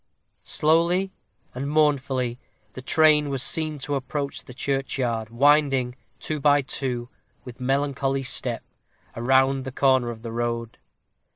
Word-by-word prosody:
Slowly 170 +5 +2 0.4
and 135 +3 -4
mournfully 135 -5 +1 0.3
the 130 - -8
train 150 +1 +4
was 135 -2 -1
seen 155 -2 0
to 145 +1 -4
approach 140 +1 -3
the 125 - -12
churchyard, 130 -5 -2
winding, 135 0 +3 0.2
two 155 -1 -4
by 145 0 +4
two, 125 -3 -3 0.4
with 125 0 -10
melancholy 135 +1 0
step, 125 -2 -2 0.5
around 135 +2 +2
the 135 - -6
corner 130 -2 +2
of 115 -1 -8
the 115 - -5
road. 115 0 -3
135 Hz, 125 wpm, -24 LUFS, 125-145 Hz, 0.5 s, train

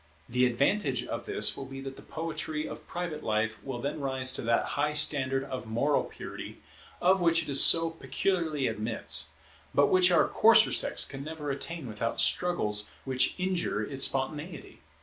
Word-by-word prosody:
The 125 +1 +2
advantage 135 - 0
of - - -6
this - - +2
will 135 - -7
be 135 0 -8
that 135 0 -7
the - - -13
poetry 155 -1 -4
of 150 - -10
private 170 -3 -5
life 110 0 -2
will 135 -3 -5
then 140 +4 -4
rise 130 -2 -1
to - - -1
that 115 0 0
high 150 +1 0
standard 135 -3 +4
of 130 -4 -7
moral 140 +6 +1
purity - - -9 0.4
of 185 +1 +3
which 165 -1 +2
it 140 - -3
so 165 +3 +6
peculiarly 165 -3 -2
admits, 105 -9 -2 0.5
but 140 - +4
which 185 0 +5
our 170 -3 +4
coarser 220 0 +5
sex - - 0
can 135 0 -8
never 150 -1 -5
attain 155 +2 -5
without 115 +1 -4
struggles 105 -13 +1 0.2
which 130 -1 +1
injure 180 - -1
its 135 +4 0
spontaneity. 150 +4 -4
140 Hz, 170 wpm, -28 LUFS, 125-165 Hz, 0.5 s, so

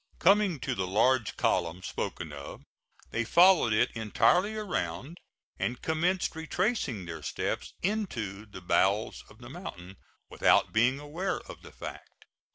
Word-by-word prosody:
Coming 195 -4 +4
to - - -1
the 95 -1 -2
large 110 +4 +2
column 85 0 0
spoken 80 -3 -4
of, 70 -1 -9 0.5
they 115 - 0
followed 175 -1 +5
it 105 - +3
entirely 175 - +2
around, 170 - -3 0.4
and 120 +1 -2
commenced 170 +3 0
retracing 160 - -1
their 80 -2 -7
steps 70 - -3
into 115 - -2
the 100 -3 -10
bowels 95 +5 +1
of - - -17
the 120 +1 -12
mountain, 95 - -9 0.3
without - - +3
being 120 +5 +3
aware 160 +7 -3
of - - -11
the - - -13
fact. - - -10
120 Hz, 140 wpm, -29 LUFS, -, 0.5 s, followed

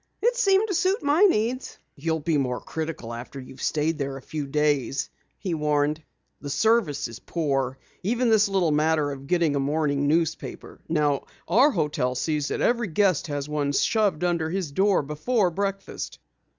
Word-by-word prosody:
"It 480 +2 +2
seemed 410 -3 +3
to 395 - -2
suit 375 +2 +1
my 290 +5 +3
needs." 250 - 0 0.2
"You'll 160 +2 -2
be 155 -1 +1
more 125 -2 -1
critical 155 -8 -5
after 120 +3 -7
you 130 0 -10
have - - -13
stayed 155 +1 0
there 135 -1 -3
a - - -10
few 150 -2 -4
days," 145 -2 0 0.3
he 185 -4 -3
warned. 150 0 +1 0.4
"The 145 - -6
service 185 -1 +2
is 115 0 -10
very - - -38
poor. 135 -5 -1 0.2
Even 235 +5 +1
this 215 -1 +4
little 185 -5 +2
matter 150 -1 +2
of 140 0 -8
getting 170 -4 +2
a - - +1
morning 145 0 0
newspaper. 160 +1 -2
Now 150 -3 +1 0.2
our 245 - +5
hotel 150 - -1
sees 150 +2 -1
that - - -2
every 235 -2 +2
guest 185 -1 +2
has 145 -1 -3
one 145 -1 -1
shoved 200 0 +2
under 170 -3 +1
his 180 -4 -2
door 190 +2 +2
before 180 - 0
breakfast." 195 +2 -4
155 Hz, 175 wpm, -25 LUFS, 145-200 Hz, 0.4 s, our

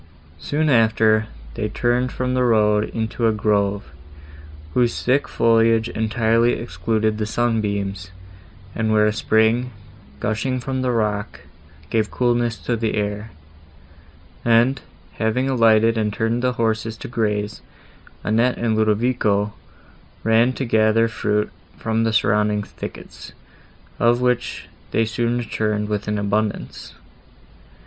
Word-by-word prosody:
Soon 150 - -1
after, 110 -3 +3 0.3
they 105 +8 -3
turned 120 +3 0
from 125 0 -2
the 130 0 +2
road 105 -3 +3
into 115 +1 -2
a - - +3
grove, 100 -6 0 0.8
whose 120 +1 +1
thick 135 +3 +2
foliage 115 0 +3
entirely 115 +2 +1
excluded 110 +4 -1
the 105 - -1
sunbeams, 100 -5 -1 0.6
and 110 -1 -1
where 105 0 +4
a 105 - +2
spring, 110 +3 +2 0.5
gushing 110 - -1
from 130 +1 -3
the 130 - 0
rock, 105 -4 -2 0.5
gave 110 -2 +1
coolness 120 -2 0
to 120 +5 -2
the 110 -1 -1
air; 105 +1 -3 1.1
and, 120 +3 +3 0.4
having 115 +4 0
alighted 115 -3 +3
and 105 -1 0
turned 115 +3 -1
the 125 0 +1
horses 110 -1 -1
to - - -8
graze, 105 -3 -2 0.6
Annette 115 +4 +1
and 115 -2 0
Ludovico 110 -1 +1 0.7
ran 115 +3 +3
to 135 - -3
gather 110 0 +3
fruit 105 -1 -1 0.3
from 110 0 -1
the 115 - +1
surrounding 105 -1 +1
thickets, - - -10 0.7
of 120 +1 +3
which 125 0 -1 0.2
they 115 - +1
soon 120 +2 -1
returned 105 -2 -2
with 105 0 -2
an 105 0 -1
abundance. 105 +1 -3
110 Hz, 125 wpm, -21 LUFS, 105-120 Hz, 1.1 s, where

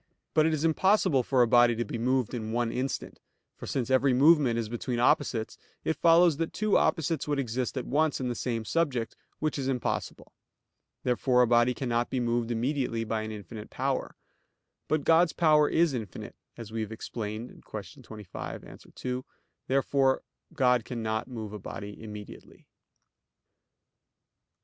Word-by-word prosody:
But 155 0 +4
it 160 - +1
is 155 +1 -1
impossible 185 -3 +3
for 125 0 +3
a - - +2
body 120 0 +5
to 120 +1 -2
be 115 - -5
moved 125 0 0
in 110 -2 -4
one 120 0 0
instant; 130 +2 -4 0.4
for - - -9
since 130 -1 -2
every 130 0 +4
movement 140 -3 +5
is 115 -2 -1
between 120 +2 -3
opposites, 115 -1 +1 0.2
it 160 - 0
follows 165 0 +5
that 165 0 -2
two 215 -1 +1
opposites 165 -3 +1
would 145 -1 0
exist 125 0 -2
at 130 - -2
once 150 +2 +1
in 130 - -2
the 120 - -1
same 115 -2 -3
subject, 135 -8 -1 0.2
which 155 -1 -2
is 135 - -2
impossible. 130 -2 -3 0.7
Therefore 125 0 +3
a - - +2
body 120 +1 +3
cannot 120 -2 -1
be 130 - -1
moved 120 -1 0
immediately 120 -1 -1
by 110 0 -2
an 110 0 -5
infinite 105 +1 -8
power. - - -2 0.7
But 155 -2 0
God's 165 +2 +4
power 150 -3 +4
is 165 -3 +3
infinite, 110 -7 -6 0.2
as 115 -2 -8
we 115 0 -3
have 110 0 -4
explained 110 +1 -6
(Q. 105 +3 -9
25, 105 -5 -8
A. - - -12
2). 125 0 -6 0.4
Therefore 135 0 +2 0.3
God 125 -2 +3
cannot 110 -2 -3
move 110 -5 -7
a 105 - -6
body 100 +1 -7
immediately. 105 -2 -10
125 Hz, 165 wpm, -28 LUFS, 115-145 Hz, 0.7 s, body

